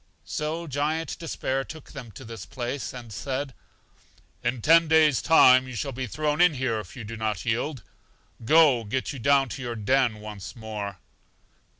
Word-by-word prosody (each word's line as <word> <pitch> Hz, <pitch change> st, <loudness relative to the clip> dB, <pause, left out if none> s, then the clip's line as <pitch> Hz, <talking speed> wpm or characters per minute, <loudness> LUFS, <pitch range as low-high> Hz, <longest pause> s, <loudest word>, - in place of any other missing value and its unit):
So 160 Hz, +3 st, -3 dB
Giant 150 Hz, +2 st, -2 dB
Despair 135 Hz, -5 st, -2 dB
took 155 Hz, +1 st, -11 dB
them 130 Hz, -4 st, -9 dB
to 135 Hz, -, -11 dB
this 115 Hz, -3 st, -8 dB
place, 125 Hz, +2 st, -4 dB
and 120 Hz, -4 st, -9 dB
said: 135 Hz, +6 st, -4 dB, 0.9 s
In 125 Hz, 0 st, -1 dB
ten 165 Hz, +1 st, +6 dB
days 155 Hz, -3 st, +4 dB
time 130 Hz, -6 st, +6 dB
you 130 Hz, -, -7 dB
shall 135 Hz, +5 st, -3 dB
be 130 Hz, 0 st, -4 dB
thrown 150 Hz, +5 st, -1 dB
in 175 Hz, -4 st, +5 dB
here 125 Hz, -4 st, -1 dB
if 100 Hz, -4 st, -10 dB
you 125 Hz, -, -7 dB
do 110 Hz, +2 st, -7 dB
not 110 Hz, -4 st, -3 dB
yield. 120 Hz, +2 st, -1 dB, 0.6 s
Go; 145 Hz, -2 st, +5 dB
get 130 Hz, +7 st, -3 dB
you 135 Hz, -, -7 dB
down 140 Hz, +2 st, +3 dB
to 115 Hz, -, -6 dB
your 120 Hz, -1 st, -4 dB
den 120 Hz, 0 st, +1 dB
once 105 Hz, 0 st, -8 dB
more. 105 Hz, -4 st, -6 dB
130 Hz, 175 wpm, -26 LUFS, 115-150 Hz, 0.9 s, ten